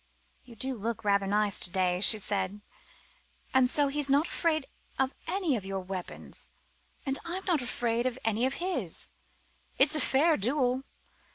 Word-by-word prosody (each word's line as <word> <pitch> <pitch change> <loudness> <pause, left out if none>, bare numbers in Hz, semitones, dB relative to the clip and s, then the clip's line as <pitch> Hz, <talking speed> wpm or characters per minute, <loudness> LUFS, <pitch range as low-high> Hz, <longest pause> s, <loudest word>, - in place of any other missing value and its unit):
"You 240 - -14
do 260 +4 -2
look 225 0 -4
rather 200 -1 +2
nice 205 0 +2
to - - -3
day," 180 0 0
she 215 - +7
said. 200 0 -1 0.9
"And 260 -1 +5
so 290 +2 +4
he's 285 0 +2
not 285 +3 +4
afraid 315 -4 0 0.3
of 265 0 +1
any 350 -5 0
of 210 - -4
your 195 0 -4
weapons! 185 -1 -5 0.6
And 270 0 -1
I'm 365 +3 -5
not 335 -6 +1
afraid 240 0 -1
of 255 -1 -3
any 225 +3 +2
of 265 - -3
his. 365 +1 -2 0.7
It's - - +5
a 305 - +3
fair 305 +4 +4
duel. 255 +3 0
250 Hz, 165 wpm, -29 LUFS, 205-285 Hz, 0.9 s, she